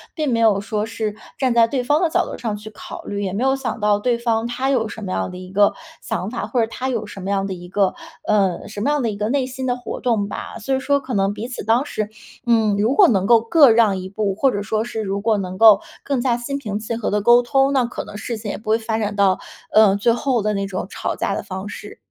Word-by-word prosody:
并 305 -5 -1
没 230 - +1
有 215 -3 +4
说 215 0 -2
是 225 -2 -3 0.2
站 255 -3 +1
在 230 -1 +5
对 255 0 -1
方 290 +5 +2
的 345 - +2
角 - - +1
度 - - -7
上 220 -3 -3
去 210 +1 -9
考 215 - -10
虑， 205 0 -4
也 185 - -3
没 220 +6 -1
有 270 0 +2
想 255 -4 -4
到 205 -1 +3
对 240 +1 +1
方 230 -1 0
他 255 +3 -2
有 240 -5 +1
什 225 - -8
么 185 - -4
样 - - -1
的 180 - -8
一 185 0 -10
个 205 +1 +4 0.3
想 210 -3 -3
法， 240 - -4
或 245 -3 +1
者 225 - +1
他 260 - -4
有 230 -4 -2
什 205 - -10
么 195 +1 -5
样 195 -1 0
的 195 - -3
一 175 0 -9
个 195 0 +1 0.3
呃， 200 -4 +1
什 210 - -7
么 255 - 0
样 295 -1 +1
的 230 - 0
一 200 - -7
个 210 - -1
内 265 +2 +1
心 260 0 -6
的 245 -1 +1
活 245 - -6
动 220 -5 0
吧。 - - -6
所 265 +5 -2
以 265 - +1
说 280 +1 +1
可 255 - -6
能 195 -1 +1
彼 230 +4 -6
此 240 - -6
当 230 +4 +3
时 215 -6 -3 0.4
嗯， 220 -4 +3
如 220 +6 +2
果 390 -8 +7
能 195 -4 +2
够 230 +1 +5
各 280 +4 +6
让 220 -4 +4
一 185 - -6
步， 200 0 -1
或 270 +5 +3
者 205 -2 -2
说 215 +1 -1
是 225 -1 -4
如 200 -1 -2
果 215 0 +2
能 185 -1 -5
够 215 -1 +7 0.2
更 275 -3 -1
加 240 -1 +1
心 275 +4 -4
平 210 -6 -4
气 225 +2 -4
和 230 - -2
地 210 - +1
沟 240 +3 +6
通， 270 +3 +2
那 255 -3 +3
可 240 - -5
能 - - -10
事 230 +1 -4
情 215 -2 -5
也 - - -5
不 215 0 -9
会 220 - +4
发 220 -1 -2
展 210 -2 -2
到， 195 -2 +3 0.3
呃， 215 -2 +6
最 220 +3 +2
后 245 -1 0
的 210 0 0
那 195 0 -1
种 185 -2 -4
吵 - - -3
架 - - -1
的 - - -3
方 190 +2 -6
式。 205 0 -9
220 Hz, 305 characters per minute, -21 LUFS, 205-245 Hz, 0.4 s, 果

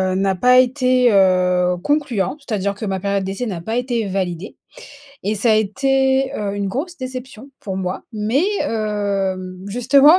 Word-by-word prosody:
n'a 195 0 +1
pas 250 +7 +5
été, 255 -1 +3
heu, 180 -2 +3
concluant. 285 -6 0
C'est-à-dire 200 -7 -2
que 215 - -5
ma 190 -2 -2
période 200 -1 -1
d'essai 195 +6 -3
n'a 185 -5 -4
pas 220 +7 -3
été 240 -3 -1
validée 185 0 -3 0.7
et 210 +2 0
ça 220 +2 +2
a - - +5
été, 265 +5 +1
heu, 200 -1 -3
une 200 -1 -2
grosse 305 - -4
déception 255 0 -7
pour 190 -2 -5
moi, 185 0 -3
mais, 220 +9 +1 0.2
heu, 205 -3 -1 0.3
justement 270 - +5
215 Hz, 160 wpm, -20 LUFS, 195-255 Hz, 0.7 s, pas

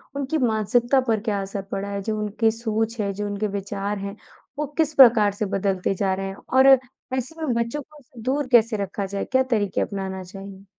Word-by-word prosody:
उनकी 280 +3 -1
मानसिकता 240 +2 +2
पर 220 -2 +2
क्या 205 -3 -1
असर 195 0 -4
पड़ा 200 +1 -3
है? 200 0 -3
जो 215 +2 -2
उनके 215 +2 +1
सोच 225 0 -2
है, 200 -1 -1
जो 205 +2 -4
उनके 205 +1 -2
विचार 200 0 -3
हैं, 200 +1 -5 0.4
वो 300 - 0
किस 310 -2 +2
प्रकार 230 -7 +7
से 205 +1 -2
बदलते 195 -1 0
जा 190 0 0
रहे 195 +1 -3
हैं 195 - -6 0.2
और 265 +1 +6 0.5
ऐसे 300 +6 -5
में 295 -6 0
बच्चों 260 +6 -5
को 270 -5 -16
दूर 265 +4 -1
कैसे 230 -2 +5
रखा 200 0 -3
जाए? 200 +1 -3
क्या 260 0 +2
तरीके 205 -4 +1
अपनाना 190 -2 -4
चाहिए? 195 +1 -11
210 Hz, 200 wpm, -23 LUFS, 200-245 Hz, 0.5 s, प्रकार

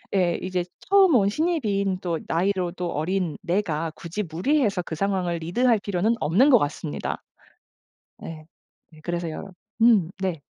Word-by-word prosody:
예 175 -3 +2
이제 185 -1 -1 0.2
처음 390 -3 +4
온 200 -4 +4
신입인 205 - 0
또 170 -3 -1
나이로도 180 0 -1
어린 170 +1 -1
내가 170 -4 -1
굳이 175 +7 -5
무리해서 200 - +1
그 160 - -6
상황을 185 -2 0
리드할 225 +9 +2
필요는 200 +4 +1
없는 220 - +4
것 250 - +8
같습니다. 150 -2 -3 1.0
네. 155 -1 -8 0.5
네 155 - -16
그래서요 175 +2 -4 0.3
음 210 -7 +5
네. 185 -4 -1
185 Hz, 280 characters per minute, -24 LUFS, 170-210 Hz, 1.0 s, 것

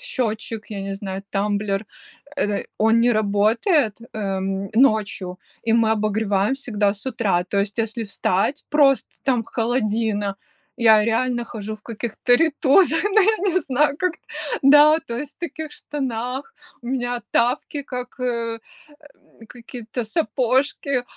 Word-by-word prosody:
счетчик, 225 -2 -3
я 200 -2 -4
не 195 0 -4
знаю, 195 -1 -5
тамблер, 200 0 -1 0.5
эт 205 -7 -1
он 225 +1 +4
не 240 +1 +4
работает, 215 - +2 0.2
эм, 195 -1 -2
ночью, 215 -6 +2 0.3
и 225 - +4
мы 230 -1 +3
обогреваем 215 0 +1
всегда 210 -7 0
с 200 - -9
утра. 200 -9 0
То 200 +2 -2
есть 200 0 -3
если 225 +1 -2
встать 200 +6 -1
просто 280 -3 +3
там 250 -4 +1
холодина, 220 -4 -1 0.4
я 220 -3 +6
реально 240 +2 0
хожу 215 -2 -6
в 210 - -15
каких-то 235 +2 0
рейтузах. 315 +3 +3
Ну 415 +1 +4
я 435 +3 +3
не 370 +2 +2
знаю, 285 +1 +1
как 365 -2 +1 0.5
да, 295 +3 +7
то 235 - -4
есть 285 +1 -7
в - - -63
таких 315 -2 -5
штанах. 265 - -4 0.3
У 240 - -12
меня 245 -1 -2
тапки, 255 +4 0
как, 250 -2 -7
э, 235 -2 -2 0.9
какие-то 240 -1 -7
сапожки, 260 0 0
230 Hz, 135 wpm, -22 LUFS, 210-265 Hz, 0.9 s, да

